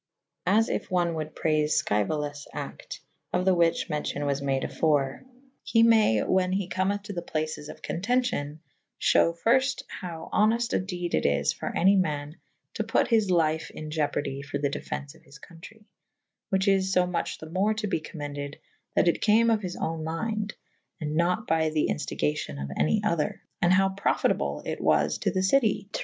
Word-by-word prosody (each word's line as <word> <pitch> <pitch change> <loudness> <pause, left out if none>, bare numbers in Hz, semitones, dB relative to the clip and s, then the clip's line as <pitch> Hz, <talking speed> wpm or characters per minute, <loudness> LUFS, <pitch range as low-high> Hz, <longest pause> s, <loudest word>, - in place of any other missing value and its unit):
As 220 +5 +4
if - - -2
one 175 -2 +1
wolde 155 -1 -5
praife 155 -1 +1
Sceuolaes 145 +6 0
acte - - -7 0.2
/ - - -46
of 180 +1 +1
Me 190 - +5
which 170 -2 +2
mencio« 150 -2 -2
was 140 -1 0
made 135 -1 0
afore, 145 -4 0 0.4
he 230 -1 +3
may 220 - +5
whan 185 -1 +1
he 195 -1 -1
cometh 190 +2 -1
to 205 0 -6
the 175 - -3
places 155 -2 -4
of - - -11
contencion 190 - -1 0.2
/ - - -51
fhew 170 0 +3
fyrfte 260 +3 +3
howe 165 -3 -7
honeft 230 +3 +2
a - - +3
dede 180 -2 -4
it - - +2
is 70 -1 +1
for - - -5
any 195 +3 +5
man 150 -4 -1 0.4
to - - -2
put - - +1
his 220 -4 +3
lyfe 160 -2 +1
in 155 0 -8
ieoperdy 145 -2 -1
for 140 0 -4
the 140 0 0
defence 140 0 -5
of - - -20
his 145 - -15
contrey 180 +8 -14 0.3
/ - - -58
whiche 190 0 +1
is 190 -1 +3
fo 180 -1 +3
much 180 -1 -2
the 160 - -9
more 205 +5 +1
to 215 0 -2
be 195 -5 0
commended 145 -2 -6 0.4
that - - +3
it 170 - +2
came 225 +2 +4
of 220 -2 +2
his 180 -3 -4
owne 160 -1 -3
mynde 210 +6 -2 0.2
/ - - -49
and 150 -2 -3
nat 180 +6 +1
by 160 -1 +2
the 155 -1 0
inftigacion 75 0 -2
of 70 0 -5
any 210 +6 +1
other 170 -8 -1
/ - - -49
and 175 - +4
howe 195 +1 +4
profitable 75 - 0
it - - -4
was 75 0 +2
to - - +1
the 185 - 0
citie 210 -2 +2
to - - -2
170 Hz, 195 wpm, -27 LUFS, 150-195 Hz, 0.4 s, Me